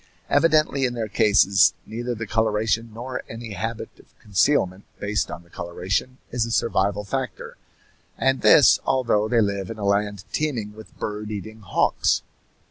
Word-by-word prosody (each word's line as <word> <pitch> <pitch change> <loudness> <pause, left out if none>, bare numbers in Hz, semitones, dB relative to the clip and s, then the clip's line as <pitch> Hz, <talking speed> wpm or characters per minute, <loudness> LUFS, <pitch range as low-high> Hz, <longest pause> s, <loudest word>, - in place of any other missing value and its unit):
Evidently 155 -4 +3
in 120 -1 -2
their 115 -2 -2
cases 100 -1 +4
neither 120 +2 -4
the 115 +1 -5
coloration 110 +1 0
nor 125 +3 -5
any 115 0 -7
habit 110 +4 -4
of - - -23
concealment 100 -2 +1 0.2
based 105 +1 -1
on 85 - -7
the 85 - -24
coloration 95 +9 -3
is 120 -1 0
a 115 - -3
survival 105 -3 +1
factor, 130 +5 -4 0.6
and 135 0 +1
this 140 - +7
although 115 -5 +1
they 115 0 +3
live 100 -2 -1
in 115 - -6
a 105 - -4
land 100 -1 0
teeming 120 -9 -2
with 110 0 -14
bird 105 0 -4
eating 110 +1 -7
hawks. 100 -4 +1
110 Hz, 155 wpm, -23 LUFS, 100-120 Hz, 0.6 s, this